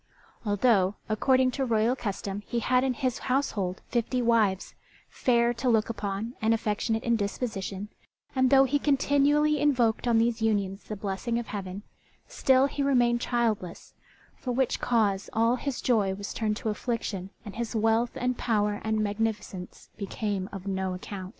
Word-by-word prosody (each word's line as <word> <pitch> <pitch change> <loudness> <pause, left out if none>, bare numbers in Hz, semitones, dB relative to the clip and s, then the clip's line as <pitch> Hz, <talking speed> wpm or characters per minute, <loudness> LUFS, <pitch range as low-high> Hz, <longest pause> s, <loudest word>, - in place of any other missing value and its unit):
Although, 205 -2 +3
according 255 +4 +3
to 270 - -2
royal 230 0 +2
custom, 200 -3 -4
he 240 - -2
had 250 +2 +2
in 260 -2 0
his 255 -2 -1
household 215 -9 -1
fifty 245 +1 0
wives, 225 -5 +2 0.4
fair 235 -1 +2
to 240 +2 -1
look 225 -1 +2
upon 205 +1 -4
and 225 +1 +3
affectionate 220 +1 -1
in 235 -1 +2
disposition, 200 -2 -3 0.5
and 260 -1 +3
though 270 0 +7
he 280 +2 +1
continually 290 +1 +3
invoked 245 -6 +2
on 235 -1 +4
these 230 0 +1
unions 200 -3 0
the 215 - -5
blessing 205 +4 -2
of 240 - -3
Heaven, 195 -1 -6 0.4
still 265 0 +3
he 280 +1 -3
remained 240 -4 +3
childless; 225 -9 -2 0.4
for 255 - -4
which 255 +1 0
cause 205 -5 +1
all 230 +3 +3
his 275 -1 -3
joy 205 -6 +2
was 200 +1 -6
turned 215 -2 -1
to 225 - -3
affliction, 210 -4 -3 0.2
and 205 - -8
his 235 0 -4
wealth 225 +2 +2
and 250 0 0
power 210 -3 0
and 220 0 0
magnificence 205 -3 -3
became 200 -1 -3
as 195 -2 -8
of 195 - -12
no 190 -1 -1
account. 185 0 -7
225 Hz, 165 wpm, -27 LUFS, 205-250 Hz, 0.5 s, though